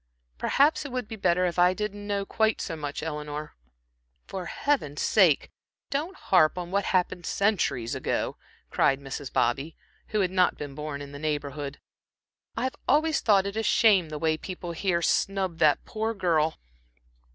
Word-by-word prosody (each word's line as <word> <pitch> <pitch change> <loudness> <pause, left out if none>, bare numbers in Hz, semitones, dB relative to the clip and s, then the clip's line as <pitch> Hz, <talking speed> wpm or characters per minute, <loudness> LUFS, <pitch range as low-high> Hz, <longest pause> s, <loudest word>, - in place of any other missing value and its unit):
Perhaps 290 +3 +3
it 285 - -7
would 250 -3 -3
be 220 - -6
better 180 -3 +2
if 175 0 -1
I 180 +1 +5
didn't 205 0 -4
know 200 -1 -1
quite 220 +1 +1
so 165 - -3
much, 145 -2 -5
Eleanor." 150 -1 -5 0.7
"For 185 -3 -6
Heaven's 205 - -1
sake, 180 -9 +4 0.4
don't 315 +7 -2
harp 180 - +3
on 175 -1 -5
what 200 0 +1
happened 180 -1 0
centuries 185 - 0
ago," - - -2 0.4
cried 135 0 +3
Mrs. 135 0 -6
Bobby, 140 +6 0 0.3
who 215 - 0
had 185 -2 0
not 185 -1 +2
been 145 -2 -6
born 145 0 -5
in 140 - -10
the 140 - -8
neighborhood. 145 -2 -3 0.8
"I've 255 +3 -1
always 310 0 +3
thought 200 -3 +4
it 200 +1 -4
a 220 - 0
shame 205 -6 +4
the 155 - -5
way 155 0 +1
people 180 0 -6
here 170 0 0
snub 190 -3 0
that 155 -3 +3
poor 220 +1 -2
girl. 165 -5 +1
180 Hz, 165 wpm, -27 LUFS, 150-205 Hz, 0.8 s, I